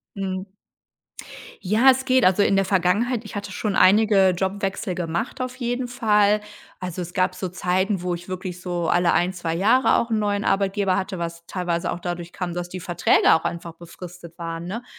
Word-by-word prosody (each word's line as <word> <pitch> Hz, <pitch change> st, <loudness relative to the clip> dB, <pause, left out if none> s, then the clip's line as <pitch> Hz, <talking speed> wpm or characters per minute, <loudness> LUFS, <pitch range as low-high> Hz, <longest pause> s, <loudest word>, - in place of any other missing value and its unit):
Mhm. 190 Hz, -1 st, -4 dB, 1.1 s
Ja, 215 Hz, +7 st, +4 dB
es 265 Hz, 0 st, +3 dB
geht. 260 Hz, -1 st, +3 dB
Also, 185 Hz, +2 st, +4 dB
in 200 Hz, -, +2 dB
der 195 Hz, 0 st, +2 dB
Vergangenheit, 205 Hz, +6 st, +1 dB
ich 210 Hz, -, -9 dB
hatte 205 Hz, -1 st, -5 dB
schon 200 Hz, +2 st, -2 dB
einige 195 Hz, 0 st, +5 dB
Jobwechsel 190 Hz, +1 st, -2 dB
gemacht 175 Hz, +8 st, -3 dB
auf 255 Hz, 0 st, -4 dB
jeden 245 Hz, 0 st, -2 dB
Fall. 210 Hz, -4 st, +2 dB, 0.4 s
Also, 180 Hz, -1 st, -5 dB
es 175 Hz, 0 st, -7 dB
gab 185 Hz, -1 st, +1 dB
so 185 Hz, -, -4 dB
Zeiten, 185 Hz, +2 st, 0 dB
wo 180 Hz, -1 st, -1 dB
ich 175 Hz, +1 st, -7 dB
wirklich 185 Hz, -1 st, -6 dB
so 175 Hz, -2 st, -2 dB
alle 175 Hz, -1 st, +3 dB
1, 180 Hz, +2 st, +1 dB
2 170 Hz, -2 st, -3 dB
Jahre 225 Hz, +9 st, +3 dB
auch 235 Hz, -, 0 dB
'n 220 Hz, -, +2 dB
neuen 205 Hz, -1 st, -1 dB
Arbeitgeber 195 Hz, -1 st, +1 dB
hatte, 190 Hz, 0 st, -3 dB
was 170 Hz, 0 st, -5 dB
teilweise 175 Hz, -2 st, -2 dB
auch -, -, -4 dB
dadurch 175 Hz, -1 st, -5 dB
kam, 180 Hz, -2 st, -4 dB
dass 175 Hz, 0 st, -4 dB
die 185 Hz, -, -6 dB
Verträge 175 Hz, -1 st, +3 dB
auch 160 Hz, -, +2 dB
einfach 170 Hz, -1 st, -4 dB
befristet 170 Hz, 0 st, -12 dB
waren, 165 Hz, 0 st, -5 dB
ne? 225 Hz, +6 st, -5 dB
185 Hz, 190 wpm, -23 LUFS, 175-210 Hz, 1.1 s, einige